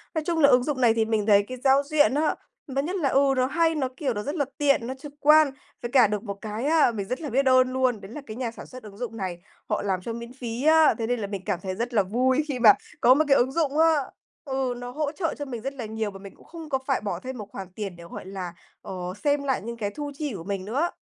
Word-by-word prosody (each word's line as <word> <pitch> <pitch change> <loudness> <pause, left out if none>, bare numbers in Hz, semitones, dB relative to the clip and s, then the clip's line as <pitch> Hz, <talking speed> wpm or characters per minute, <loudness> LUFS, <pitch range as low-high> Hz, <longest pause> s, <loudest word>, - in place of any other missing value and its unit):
Nói 315 - 0
chung 335 -2 0
là 280 - +6
ứng 250 -2 +5
dụng 270 -2 -2
này 230 -2 +5
thì 225 -1 +1
mình 220 -2 0
thấy 205 -1 +5
cái 255 0 -6
giao 275 +1 +5
diện 295 -1 +3
á, 300 +2 +1 0.4
và 275 - +2
nhất 355 +6 -3
là 295 -8 +1
ừ, 275 0 +3
nó 255 - +3
hay, 325 +3 +1
nó, 270 -4 0
kiểu, 275 -6 -1
nó 210 - -3
rất 290 - -4
là 285 -4 +1
tiện, 275 -5 +2
nó 260 - -3
trực 285 +2 -11
quan, 300 -1 +6 0.3
với 240 - -5
cả 250 -5 +6
được 210 +1 -3
một 200 - -4
cái 220 +4 -4
á, 310 -4 +4
mình 200 -4 -4
rất 255 +5 -3
là 295 - -4
biết 270 +3 +1
ơn 255 0 +4
luôn 255 -5 +1
đấy 195 - -10
là 295 +4 -7
cái 220 -1 -8
nhà 240 -3 -2
sản - - -10
xuất 255 -1 -11
ứng 205 -2 -12
dụng 230 -1 -5
này 180 -3 -4 0.3
họ 210 - 0
làm 190 -2 -1
cho 230 - -5
miễn 235 +1 -8
phí 245 -1 -5
á, 315 0 +6
thế 225 - -1
nên 245 -1 0
là 205 - -3
mình 200 -2 -5
cảm 195 -4 -1
thấy 185 0 -4
rất 235 +4 -3
là 205 - +4
vui 255 +8 +1
khi 265 -4 -3
mà 220 -3 +8 0.3
có 250 - +7
một 310 +4 +2
cái 275 - +5
ứng 255 +2 +2
dụng 300 -2 0
á, 325 +1 +6 0.6
ừ, 265 -2 -1
nó 245 0 -7
hỗ 290 +2 -2
trợ 325 +1 -2
cho 290 - -4
mình 240 -4 -6
rất 270 +4 -4
là 250 -4 -6
nhiều 220 -1 -3
và 195 - -11
mình 195 0 -11
cũng - - -20
không 325 -2 -10
có 265 -2 0
phải 270 -2 0
bỏ 205 - -3
thêm 260 -1 -7
một 210 - -7
khoản 190 - -7
tiền 200 -4 -5
để, 170 - -12
gọi 170 - -9
là, 185 -2 -6 0.3
ờ, - - -8 0.3
xem 290 -1 +2
lại 265 -6 0
những 235 +3 -6
cái 205 -3 -2
thu 290 -1 -4
chi 295 -3 -3
của 165 - -7
mình 195 -1 -4
nữa. 280 +11 0
255 Hz, 300 wpm, -25 LUFS, 215-285 Hz, 0.6 s, mà